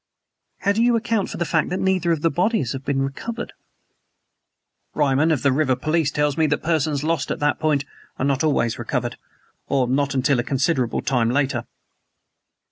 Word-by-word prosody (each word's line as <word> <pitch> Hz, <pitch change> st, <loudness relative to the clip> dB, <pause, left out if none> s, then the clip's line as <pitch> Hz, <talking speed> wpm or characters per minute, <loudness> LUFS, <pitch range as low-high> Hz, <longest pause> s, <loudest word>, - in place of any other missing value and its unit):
"But -, -, -15 dB
how 200 Hz, -, +4 dB
do 210 Hz, +3 st, +1 dB
you 240 Hz, 0 st, +4 dB
account 230 Hz, -3 st, 0 dB
for -, -, -6 dB
the 170 Hz, -, -1 dB
fact -, -, +1 dB
that 185 Hz, -, -2 dB
neither 185 Hz, -3 st, +1 dB
of 160 Hz, -3 st, 0 dB
the 165 Hz, -, +3 dB
bodies 175 Hz, -, 0 dB
have 135 Hz, 0 st, -6 dB
been 135 Hz, -1 st, 0 dB
recovered?" 230 Hz, -, -5 dB, 1.4 s
"Ryman 145 Hz, +1 st, +2 dB
of 150 Hz, -, 0 dB
the 140 Hz, -, +4 dB
river 130 Hz, -1 st, +2 dB
police 155 Hz, +1 st, 0 dB
tells 150 Hz, 0 st, 0 dB
me 160 Hz, -, +4 dB
that 150 Hz, -, -1 dB
persons 155 Hz, -3 st, 0 dB
lost 160 Hz, -3 st, -1 dB
at -, -, -1 dB
that 145 Hz, 0 st, +1 dB
point 150 Hz, -3 st, +1 dB, 0.3 s
are 130 Hz, -, -1 dB
not 140 Hz, +1 st, +1 dB
always 120 Hz, -7 st, +1 dB
recovered -, -, -2 dB, 0.5 s
or 130 Hz, -3 st, +1 dB
not 140 Hz, +2 st, 0 dB
until 130 Hz, 0 st, +2 dB
a -, -, +1 dB
considerable 135 Hz, -1 st, 0 dB
time 120 Hz, -4 st, +1 dB
later." 130 Hz, -2 st, 0 dB
145 Hz, 190 wpm, -22 LUFS, 135-165 Hz, 1.4 s, how